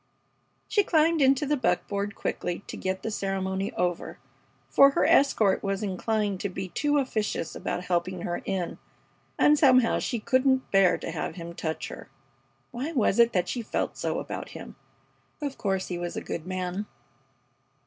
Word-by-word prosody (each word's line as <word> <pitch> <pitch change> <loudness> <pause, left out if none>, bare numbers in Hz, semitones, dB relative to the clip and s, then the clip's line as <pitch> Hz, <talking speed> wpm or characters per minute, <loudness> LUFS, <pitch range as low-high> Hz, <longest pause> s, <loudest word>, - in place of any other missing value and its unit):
She 420 -2 +3
climbed 325 -2 +3
into 270 +2 +4
the 295 +1 +1
buckboard 200 -3 -1
quickly 175 +2 -3
to - - -7
get 190 0 -3
the 220 - -2
ceremony 195 -1 -2
over, 175 -1 -2 0.5
for 275 - +7
her 275 - +1
escort 220 -8 +4
was 195 +1 -2
inclined 205 0 -1
to 200 - -2
be 185 0 -5
too 290 - +1
officious 215 - -1
about 175 - -3
helping 180 0 -1
her 175 - -3
in, 190 -3 -3 0.6
and 295 0 +5
somehow 255 -5 +5
she 240 - -2
couldn't 260 +3 +2
bear 195 -2 +5
to - - -5
have 160 - -4
him 170 -1 -7
touch 160 -2 -4
her. - - -10 0.6
Why 265 +7 -4
was 235 -5 +2
it 235 0 +6
that 180 -1 +1
she 245 - -2
felt 220 - -2
so - - -2
about - - -5
him? - - -10 0.6
Of 285 -3 -4
course 190 -2 -1
he 175 -1 -3
must 175 0 -4
be - - -3
a - - -14
good 165 +1 -5
man. 185 +2 -3
200 Hz, 170 wpm, -27 LUFS, 185-260 Hz, 0.6 s, for